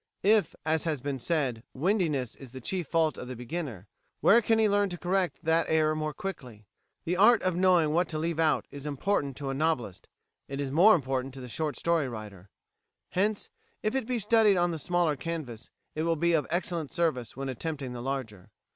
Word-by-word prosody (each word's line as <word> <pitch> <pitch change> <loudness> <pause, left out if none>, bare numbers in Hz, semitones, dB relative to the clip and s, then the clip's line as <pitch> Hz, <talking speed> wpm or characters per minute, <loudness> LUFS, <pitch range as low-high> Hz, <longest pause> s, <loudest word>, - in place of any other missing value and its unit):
If, 210 +1 +3
as 160 0 +1
has 155 -4 -1
been 135 +1 -3
said, 130 -5 -1
"windiness" 150 - 0
is 135 -3 -12
the 130 - -7
chief 175 +5 -3
fault 160 -3 +1
of 125 - -7
the 130 - -6
beginner, 125 - -5 0.3
where 230 +4 +6
can 225 0 +2
he 220 -1 +4
learn 205 -1 +2
to 175 - -5
correct 185 +1 0
that 165 +1 +2
error 155 -1 +3
more 155 0 -2
quickly? 130 - -7 0.4
The 175 +2 0
art 220 +4 +6
of 185 -2 +1
knowing 180 -4 +4
what 170 +2 +1
to 155 - -2
leave 165 +1 -2
out 160 -2 +2
is 145 +1 -7
important 145 -2 -1
to 140 -2 -3
a - - -2
novelist; 135 - -1 0.4
it 140 0 -5
is 140 -2 -2
more 185 +9 +7
important 135 -3 -2
to - - -8
the 125 - -7
short 150 +5 -3
story 165 -5 +1
writer; 105 -5 -9 0.6
hence, 205 +3 -1 0.3
if 215 - 0
it 265 -4 -1
be 250 -1 0
studied 215 -2 +4
on 175 0 +2
the 165 - -4
smaller 175 -1 +1
canvas, 135 -7 -6 0.2
it 155 - -3
will 165 +1 +1
be 170 +2 +1
of 155 -3 +1
excellent 170 -3 -2
service 145 -10 -1
when 135 0 -3
attempting 135 0 -4
the 120 - -6
larger. 125 -8 -5
160 Hz, 205 wpm, -29 LUFS, 135-180 Hz, 0.6 s, more